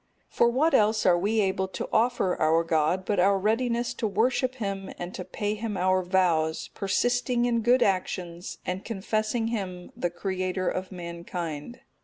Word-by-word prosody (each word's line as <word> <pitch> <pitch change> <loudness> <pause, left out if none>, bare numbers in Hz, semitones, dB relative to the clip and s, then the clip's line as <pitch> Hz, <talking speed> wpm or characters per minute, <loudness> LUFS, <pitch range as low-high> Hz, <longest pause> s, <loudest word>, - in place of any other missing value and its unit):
For 235 - +3
what 295 +7 +2
else 215 0 +3
are 180 - +6
we 210 +5 +1
able 190 -1 0
to 190 - -5
offer 225 -5 +2
to - - -11
our 160 +2 +4
God, 165 +3 +1
but 205 -1 0
our 195 +2 +4
readiness 235 +4 0
to 220 - -2
worship 250 +5 +1
Him 195 -5 -4
and 175 +1 -6
to 185 - -5
pay 205 +3 -3
Him 215 -1 -4
our 185 +1 +2
vows, 175 -4 +1
persisting 245 +4 +1
in 235 -1 +1
good 245 +3 +4
actions, 180 -2 -2
and 185 +1 -3
confessing 220 +2 -1
Him 185 -5 -4
the 175 -7 -1
Creator 185 +1 -2
of 185 +1 -4
mankind? 170 +1 -6
195 Hz, 170 wpm, -27 LUFS, 180-225 Hz, -, are